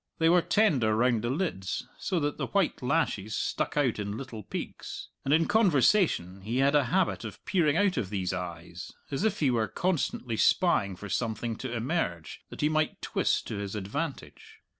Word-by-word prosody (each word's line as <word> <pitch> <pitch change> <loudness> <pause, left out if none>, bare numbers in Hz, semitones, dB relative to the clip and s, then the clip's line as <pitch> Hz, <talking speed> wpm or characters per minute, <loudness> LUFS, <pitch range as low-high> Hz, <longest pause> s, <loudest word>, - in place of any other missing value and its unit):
They 165 -1 +4
were 175 +1 +5
tender 140 - +3
round 120 -1 +3
the 120 - -2
lids, 130 - -2
so 185 -3 0
that 145 0 -2
the - - -1
white 200 -4 0
lashes 110 -4 0
stuck - - -2
out 130 -7 +2
in 105 +1 -3
little 125 -5 -7
peaks. 95 - -6
And 135 - -1
in 160 +2 +4
conversation 175 - +3
he 115 +6 -3
had 135 +2 +3
a 145 -2 +4
habit 185 +8 +1
of - - -9
peering 165 -5 +2
out 200 -2 +2
of 95 - -1
these 95 -3 -2
eyes 85 -1 -6 0.2
as 140 +7 -1
if 215 -4 0
he 140 -4 +4
were 115 -3 +1
constantly 125 - -1
spying 105 - +3
for 105 +3 -8
something 115 +1 -2
to 130 - -5
emerge 115 - -2
that - - -8
he 150 - +4
might 155 0 0
twist - - 0
to - - -3
his 100 0 -4
advantage. 135 +10 -5
125 Hz, 185 wpm, -29 LUFS, 105-165 Hz, 0.2 s, were